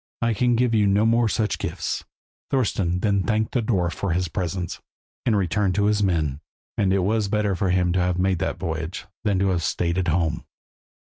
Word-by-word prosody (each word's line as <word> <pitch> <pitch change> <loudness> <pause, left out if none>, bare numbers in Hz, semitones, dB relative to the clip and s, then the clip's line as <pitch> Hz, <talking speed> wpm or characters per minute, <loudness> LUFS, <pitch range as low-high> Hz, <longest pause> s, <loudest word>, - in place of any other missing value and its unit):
I 115 -1 +2
can 120 +2 +2
give 120 0 +2
you 105 -2 +3
no 100 +2 +3
more 115 +1 +3
of 110 - 0
such 110 -2 0
gifts." - - -3 0.5
Thorston 95 -9 0
then 100 -2 +2
thanked 110 +1 0
the 125 - +1
dwarf 95 -7 0
for 95 -1 -2
his 90 -1 0
presents, 90 -1 -3 0.5
and 110 -3 +3
returned 95 0 +1
to 100 - +2
his 105 0 +2
men; 80 -7 0 0.3
and 95 -2 +1
it 95 -1 +2
was 105 +1 +1
better 105 -1 0
for 95 +1 0
him 90 -1 +2
to 95 - +1
have 90 0 +1
made 95 -1 +1
that - - -2
voyage 80 +1 -4 0.2
than 100 -3 +1
to 95 +1 +2
have 90 -2 0
stayed 85 +3 0
at 90 - -1
home. 80 -2 0
95 Hz, 210 wpm, -24 LUFS, 90-105 Hz, 0.5 s, you